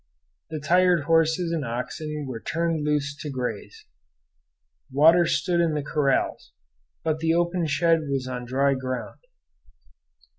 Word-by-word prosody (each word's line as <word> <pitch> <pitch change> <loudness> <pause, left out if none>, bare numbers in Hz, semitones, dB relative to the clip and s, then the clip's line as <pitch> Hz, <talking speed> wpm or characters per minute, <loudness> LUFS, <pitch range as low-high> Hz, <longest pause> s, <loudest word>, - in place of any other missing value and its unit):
The 155 -1 -4
tired 180 +1 +3
horses 165 +2 +2
and 165 -3 -1
oxen 150 +5 -4
were 125 -3 -5
turned 165 +3 -1
loose 145 -2 0
to 150 - -5
graze. 125 -3 -5 1.1
Water 165 +5 +5
stood 175 -1 +1
in 165 -2 +1
the 150 - -2
corrals, 140 -1 -1 0.5
but 155 -1 -1
the 165 +1 +1
open 175 0 0
shed 160 +2 +2
was 135 -2 -2
on 125 -1 -5
dry 135 +3 +2
ground. 130 -1 -5
150 Hz, 135 wpm, -25 LUFS, 140-165 Hz, 1.1 s, Water